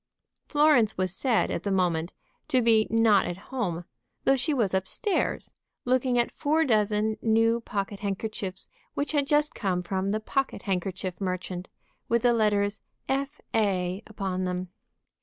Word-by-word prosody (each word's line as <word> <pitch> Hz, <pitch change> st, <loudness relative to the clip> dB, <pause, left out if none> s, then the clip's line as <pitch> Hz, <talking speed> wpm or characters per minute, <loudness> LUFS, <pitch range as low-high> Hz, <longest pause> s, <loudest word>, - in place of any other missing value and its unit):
Florence 290 Hz, -8 st, +4 dB
was 185 Hz, -1 st, -1 dB
said, 245 Hz, +1 st, +1 dB
at -, -, -2 dB
the 205 Hz, -, -3 dB
moment, 175 Hz, -3 st, +1 dB, 0.4 s
to 270 Hz, -4 st, +3 dB
be 225 Hz, -2 st, +4 dB
not 225 Hz, -3 st, +4 dB
at 175 Hz, -, -4 dB, 0.2 s
home, 175 Hz, -9 st, -2 dB, 0.4 s
though 270 Hz, -, +4 dB
she 265 Hz, +4 st, 0 dB
was 230 Hz, -10 st, +1 dB
up 190 Hz, 0 st, 0 dB
stairs, 415 Hz, -5 st, 0 dB, 0.3 s
looking 255 Hz, 0 st, +2 dB
at 240 Hz, -, +2 dB
four 315 Hz, +2 st, +1 dB
dozen 215 Hz, -2 st, +2 dB
new 225 Hz, +1 st, +3 dB
pocket 200 Hz, -1 st, -3 dB
handkerchiefs 200 Hz, -1 st, -4 dB, 0.3 s
which 285 Hz, -, -1 dB
had 285 Hz, -3 st, +1 dB
just 295 Hz, 0 st, +2 dB
come 185 Hz, -4 st, -1 dB
from 190 Hz, +2 st, -1 dB
the 215 Hz, +2 st, 0 dB
pocket 270 Hz, +5 st, -2 dB
handkerchief 185 Hz, -1 st, -3 dB
merchant, 185 Hz, -1 st, -3 dB, 0.4 s
with 235 Hz, 0 st, +2 dB
the 245 Hz, -1 st, +5 dB
letters 210 Hz, -2 st, +1 dB, 0.3 s
F.A. 215 Hz, -9 st, -1 dB
upon 195 Hz, -3 st, -3 dB
them. 180 Hz, 0 st, -3 dB
215 Hz, 150 wpm, -27 LUFS, 190-245 Hz, 0.4 s, the